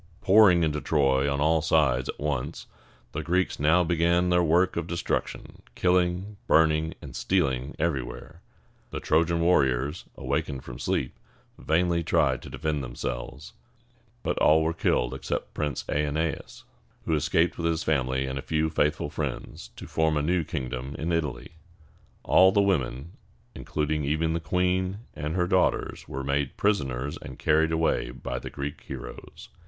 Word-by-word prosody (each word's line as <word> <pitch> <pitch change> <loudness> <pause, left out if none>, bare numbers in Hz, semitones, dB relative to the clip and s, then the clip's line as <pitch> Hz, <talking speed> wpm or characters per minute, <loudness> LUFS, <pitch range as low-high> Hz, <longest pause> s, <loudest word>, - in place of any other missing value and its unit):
Pouring 95 -4 +6
into 75 -2 0
Troy 70 -2 +2
on 70 - -1
all 80 +2 +3
sides 75 -5 +2
at - - -5
once, 75 +1 -3 0.5
the 80 - -3
Greeks 90 +4 0
now 80 +5 +4
began 85 +1 +2
their 90 0 +4
work 90 +3 +3
of 85 -1 -2
destruction, 85 0 -3
killing, 90 +3 +1
burning, 80 0 +3
and - - -9
stealing 70 -7 0
everywhere. 80 +2 -3 0.5
The - - -5
Trojan 85 +2 +2
warriors, 75 -3 +2
awakening 70 0 -2
from - - -9
sleep, - - -2 0.4
vainly 85 +1 +1
tried - - +2
to - - -10
defend 75 -2 -2
themselves; 60 - -6 0.7
but - - -1
all 80 +1 +5
were 80 +1 0
killed 60 -6 0
except 65 0 -4
Prince 75 -4 -2
Æ 75 0 -1
ne´as, 80 +2 -3 0.4
who 80 - 0
escaped 80 +3 +1
with 85 - 0
his 80 -1 0
family 65 -3 0
and 65 0 -3
a - - -4
few 80 +1 0
faithful 75 -1 0
friends, - - -5
to - - -9
form 80 -1 +1
a 75 - 0
new 85 +2 +1
kingdom 65 -2 -5
in 80 +3 -2
Italy. 75 -7 -2 0.7
All 95 +1 +6
the 100 - +2
women, 80 -6 0 0.4
including 75 0 -2
even 80 +3 0
the 85 - 0
queen 90 +4 0
and 75 +2 -4
her 90 -1 +2
daughters, 90 0 0
were 70 +1 -5
made 70 0 -1
prisoners 70 -10 0
and 65 - -9
carried 80 +1 +2
away 80 -6 +1
by 60 0 -5
the - - -7
Greek 70 0 -6
heroes. - - -9
80 Hz, 155 wpm, -27 LUFS, 70-85 Hz, 0.7 s, Pouring